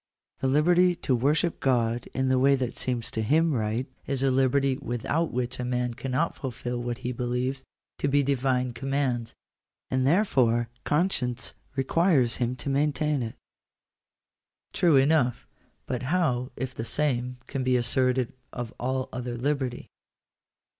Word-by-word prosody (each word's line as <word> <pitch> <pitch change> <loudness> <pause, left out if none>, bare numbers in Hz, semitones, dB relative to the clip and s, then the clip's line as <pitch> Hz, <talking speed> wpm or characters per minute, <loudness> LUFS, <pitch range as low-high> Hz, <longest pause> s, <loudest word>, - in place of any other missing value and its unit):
The 135 - 0
liberty 175 +6 +4
to 135 -6 0
worship 150 +7 +1
God 120 -2 +1
in 130 0 +1
the 130 0 +3
way 140 +1 +5
that 130 -2 -2
seems 120 -3 -2
to 110 - -2
him 155 +8 +3
right, 110 +1 -1 0.2
is 135 -1 -1
a 135 - +3
liberty 135 +1 +2
without 140 +6 -1
which 125 +1 -2
a - - -1
man 125 -1 -1
cannot 130 +6 -1
fulfil 125 -2 -4
what 120 -1 -3
he 125 - 0
believes 125 +2 -2 0.4
to - - 0
be 140 +1 +3
Divine 130 -2 +1
commands, 125 -2 -2 0.6
and 130 0 +2
therefore 125 - +3 0.2
conscience 145 -7 0 0.2
requires 135 -2 +2
him 125 0 -1
to 125 - -8
maintain 145 +1 +1
it." 115 -2 -4 1.4
True 170 -4 +4
enough; 135 -2 +3 0.4
but 125 -2 -3
how 130 -4 0
if 130 -1 -4
the 115 - -5
same 125 -2 -1
can 135 -1 -3
be 130 0 +3
asserted 125 +1 +1 0.2
of 120 -2 -5
all 130 +1 -1
other 125 -1 -4
liberty 130 -1 -2
130 Hz, 145 wpm, -27 LUFS, 125-140 Hz, 1.4 s, way